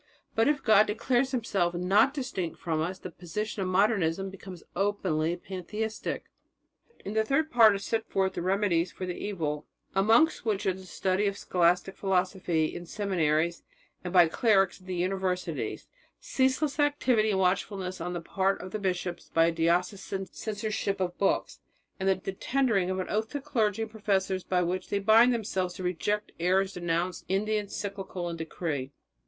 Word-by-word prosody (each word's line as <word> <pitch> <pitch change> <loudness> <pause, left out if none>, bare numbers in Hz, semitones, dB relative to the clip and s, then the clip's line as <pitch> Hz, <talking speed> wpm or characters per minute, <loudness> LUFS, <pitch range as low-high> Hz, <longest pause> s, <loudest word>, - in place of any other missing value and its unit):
But 225 - +3
if 295 -1 +1
God 215 -2 +6
declares 245 +5 +1
Himself 200 -9 0
not 195 +8 +4
distinct 250 - -4
from 160 -2 -1
us, 180 +4 -2
the 185 - -8
position 205 +5 -4
of 185 - -1
Modernism 195 -2 +1
becomes 190 -2 -10
openly 175 -5 0
pantheistic." 200 +5 -4 0.8
In 200 - -4
the 220 0 +2
third 310 +7 +1
part 225 -4 +7
are - - 0
set 220 +2 -2
forth 190 -1 +1
the - - -3
remedies 185 -2 +1
for 185 - -6
the 180 - -3
evil, 160 -7 -3 0.3
amongst 225 +11 +4
which 210 -4 -1
are 190 - +2
the 190 0 -11
study 190 +3 0
of 200 0 -2
scholastic 180 +1 +1
philosophy 185 -4 0
in 175 0 -7
seminaries 170 -4 0 0.4
and 180 - -4
by 175 -2 +7
clerics 195 +1 +2
at 185 - -18
the 185 - -3
universities; 185 0 -2 0.3
ceaseless 265 +3 0
activity 260 -7 +2
and 195 -2 +1
watchfulness 185 -1 -1
on 180 +1 -3
the 175 - -3
part 195 +3 0
of 185 +1 -8
the 215 - -3
bishops 180 -3 -3
by 165 0 +4
a 170 - +2
diocesan 180 +4 0
censorship 210 -1 -3
of 175 -1 -1
books, 195 - 0 0.4
and 190 0 +1
the 190 0 0
tendering 215 -3 +1
of 185 - -1
an 185 - -2
oath 220 +1 -1
to 285 - -3
clergy 225 -7 0
and 220 - -7
professors 195 -3 0
by 180 -1 +1
which 180 +2 -2
they 200 - +1
were 200 - -4
to - - -19
bind 225 +3 +7
themselves 190 -6 -2
to 185 - -7
reject 205 +4 -1
the - - -5
errors 190 +1 +2
denounced 175 +1 -2
in 195 +2 +1
the 215 0 +1
encyclical 200 -3 -4
and 165 -1 -6
decree. 155 -4 -3
190 Hz, 180 wpm, -28 LUFS, 180-215 Hz, 0.8 s, part